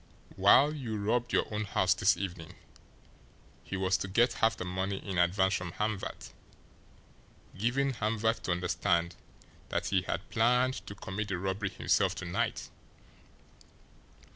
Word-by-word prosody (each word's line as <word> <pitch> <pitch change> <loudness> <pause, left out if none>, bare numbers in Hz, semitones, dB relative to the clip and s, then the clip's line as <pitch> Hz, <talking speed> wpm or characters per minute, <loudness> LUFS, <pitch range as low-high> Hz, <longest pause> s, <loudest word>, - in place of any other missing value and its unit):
While 120 +10 +6
you 120 -8 -4
robbed 115 +4 0
your - - +2
own 105 +1 -1
house 95 -2 +2
this 95 -1 +3
evening, 90 -2 -6 1.1
he 95 - -5
was 95 0 +2
to - - -4
get 115 +6 +3
half 115 - +3
the - - -5
money 95 +2 -2
in 95 -3 -3
advance 95 +2 +3
from 90 -3 -3
Hamvert, 105 -2 -4 1.2
giving 130 +7 0
Hamvert 110 0 0
to - - 0
understand 85 -1 0 0.5
that - - -1
HE 95 -2 +2
had 90 - -3
planned 125 +3 +3
to 100 - -7
commit 100 +2 -4
the 95 -3 -2
robbery 95 +2 -2
himself - - +1
to - - -6
night. - - -2
100 Hz, 140 wpm, -30 LUFS, 95-110 Hz, 1.2 s, While